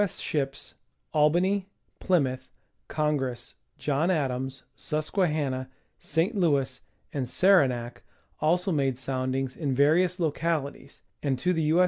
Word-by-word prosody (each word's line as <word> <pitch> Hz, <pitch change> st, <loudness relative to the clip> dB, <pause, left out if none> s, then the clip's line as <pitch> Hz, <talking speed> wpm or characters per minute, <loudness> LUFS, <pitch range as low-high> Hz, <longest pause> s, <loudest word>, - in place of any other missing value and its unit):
S. 200 Hz, -4 st, 0 dB
ships 135 Hz, -3 st, -3 dB, 0.4 s
Albany, 180 Hz, +6 st, +3 dB, 0.3 s
Plymouth, 130 Hz, -8 st, +1 dB, 0.4 s
Congress, 145 Hz, -5 st, -1 dB, 0.2 s
John 150 Hz, +4 st, 0 dB
Adams, 135 Hz, -5 st, -1 dB
Susquehanna, 150 Hz, -5 st, -1 dB, 0.3 s
St. 175 Hz, +8 st, 0 dB
Louis 145 Hz, -9 st, +1 dB, 0.3 s
and 130 Hz, -4 st, -2 dB
Saranac 125 Hz, -10 st, +3 dB, 0.4 s
also 180 Hz, +5 st, +2 dB
made 135 Hz, -5 st, +1 dB
soundings 130 Hz, 0 st, -2 dB
in 140 Hz, -5 st, -1 dB
various 170 Hz, +7 st, +3 dB
localities, 160 Hz, -2 st, -2 dB, 0.2 s
and 135 Hz, -3 st, 0 dB
to 180 Hz, +7 st, +1 dB
the 165 Hz, -, 0 dB
U. 155 Hz, +3 st, +3 dB
150 Hz, 110 wpm, -27 LUFS, 130-170 Hz, 0.4 s, Albany